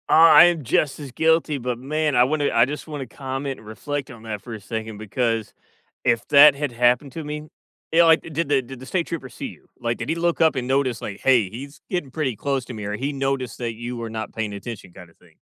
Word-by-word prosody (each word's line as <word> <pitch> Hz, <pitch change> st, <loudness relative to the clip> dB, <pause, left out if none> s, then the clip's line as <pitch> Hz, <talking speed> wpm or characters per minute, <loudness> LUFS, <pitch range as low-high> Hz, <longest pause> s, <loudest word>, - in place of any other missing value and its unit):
Uh, -, -, +3 dB
I 165 Hz, +1 st, +9 dB
am 170 Hz, -3 st, +1 dB
just 135 Hz, +4 st, +1 dB
as 140 Hz, -3 st, -8 dB
guilty, 160 Hz, +1 st, +2 dB
but 125 Hz, -2 st, -3 dB
man, 150 Hz, +3 st, -1 dB
I 120 Hz, -, +6 dB
wanna 145 Hz, +2 st, +1 dB
I 115 Hz, 0 st, +5 dB
just 150 Hz, +5 st, -6 dB
wanna 145 Hz, -3 st, -5 dB
comment, 135 Hz, +2 st, -5 dB
and 110 Hz, -, -15 dB
reflect 140 Hz, +5 st, -5 dB
on 115 Hz, -2 st, -12 dB
that 105 Hz, -3 st, -5 dB
for 120 Hz, -, -9 dB
a 110 Hz, -, -6 dB
second 110 Hz, +1 st, -5 dB
because 115 Hz, +1 st, -2 dB, 0.5 s
if 115 Hz, -1 st, +1 dB
that 145 Hz, -1 st, +8 dB
had 145 Hz, -1 st, -2 dB
happened 125 Hz, +3 st, +2 dB
to 165 Hz, -, -5 dB
me 150 Hz, +1 st, -6 dB, 0.4 s
you 165 Hz, -, +4 dB
know, 170 Hz, -, +8 dB
like, 160 Hz, 0 st, +6 dB
did 160 Hz, -1 st, -3 dB
the 140 Hz, -2 st, +3 dB
did 130 Hz, 0 st, -10 dB
the 130 Hz, -, -10 dB
state 170 Hz, +4 st, -1 dB
trooper 150 Hz, -6 st, -5 dB
see -, -, -6 dB
you? -, -, -14 dB
Like, 115 Hz, 0 st, -1 dB
did -, -, -5 dB
he 160 Hz, -, +1 dB
look 170 Hz, 0 st, 0 dB
up 160 Hz, -2 st, +4 dB
and 130 Hz, -2 st, -2 dB
notice 130 Hz, -2 st, 0 dB
like, 100 Hz, -, -6 dB
"Hey, 120 Hz, -7 st, +4 dB
he's 140 Hz, +8 st, -9 dB
getting 175 Hz, -7 st, -2 dB
pretty 135 Hz, -4 st, -2 dB
close 135 Hz, 0 st, -1 dB
to 125 Hz, -, -8 dB
me" 105 Hz, -2 st, -6 dB
or 105 Hz, -, -3 dB
he 135 Hz, +6 st, -2 dB
noticed 135 Hz, -3 st, -2 dB
that 120 Hz, -2 st, -3 dB
you 120 Hz, +2 st, -6 dB
were 115 Hz, -1 st, -5 dB
not 110 Hz, 0 st, -5 dB
paying 110 Hz, -2 st, -3 dB
attention, 100 Hz, -2 st, -8 dB
kind 90 Hz, -1 st, -13 dB
of 80 Hz, -, -26 dB
thing. -, -, -24 dB
130 Hz, 255 wpm, -23 LUFS, 115-150 Hz, 0.5 s, I